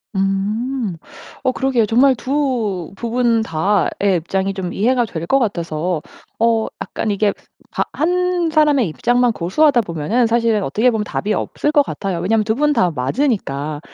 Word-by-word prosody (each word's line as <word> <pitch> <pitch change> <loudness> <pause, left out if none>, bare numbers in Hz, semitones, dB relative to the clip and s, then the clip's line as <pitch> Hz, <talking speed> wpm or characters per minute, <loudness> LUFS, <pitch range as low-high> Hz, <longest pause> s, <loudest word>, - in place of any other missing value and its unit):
음. 200 +3 -1 0.5
어 260 - +2
그러게요. 260 -4 +1
정말 255 +5 +4
2 240 - -2
부분 235 0 +1
다의 195 +2 +1
입장이 190 +4 -2
좀 185 -2 -4
이해가 245 +3 +2
될 170 -7 -6
것 270 - +3
같아서. 170 - -2 0.4
어 225 -1 +2
약간 215 - -3
이게 205 0 +1 0.4
바 - - 0
1 355 +1 0
사람의 295 - +3
입장만 245 - +2
고수하다 240 - +2
보면은 200 +7 0
사실은 230 -2 +1
어떻게 215 - +2
보면 220 -2 -1
답이 210 +1 -3
없을 295 - -1
것 295 -2 +4
같아요, 195 -9 -4
왜냐하면 215 +5 +1
2 220 +1 0
분 295 +3 +2
다 185 -9 +2
맞으니까. 150 - -1
220 Hz, 295 characters per minute, -19 LUFS, 190-255 Hz, 0.5 s, 정말